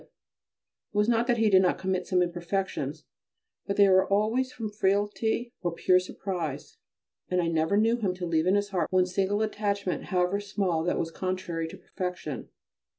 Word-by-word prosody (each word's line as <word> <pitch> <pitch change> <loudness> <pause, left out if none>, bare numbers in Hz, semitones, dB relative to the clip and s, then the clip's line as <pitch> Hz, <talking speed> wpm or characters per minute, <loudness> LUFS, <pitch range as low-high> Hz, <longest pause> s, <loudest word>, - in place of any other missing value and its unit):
It - - -22 0.9
was 210 +1 +2
not 235 0 +2
that 240 -2 +2
he 225 -1 +3
did 190 -2 +6
not 180 - +2
commit 190 -1 -2
some 180 -1 +3
imperfections, 175 -4 -3 0.6
but 200 - -2
they 200 -1 +7
were 190 0 +4
always 225 +6 +1
from 225 -3 -5
frailty 210 +4 0
or 175 -2 -1
pure 185 +1 +4
surprise, 175 -6 -5 0.5
and 180 - +1
I 170 - +1
never 165 +4 +1
knew 225 +3 +3
him 195 -6 -1
to 180 -1 -4
leave 165 0 +1
in 190 - +4
his 205 0 0
heart 185 -3 -1
one 185 -1 +4
single 195 +3 0
attachment, 200 -3 -2
however 180 +2 +1
small, 195 -5 -1
that 180 - +1
was 165 - -2
contrary 185 -3 -3
to - - -10
perfection. 180 - -5
190 Hz, 180 wpm, -28 LUFS, 180-205 Hz, 0.9 s, they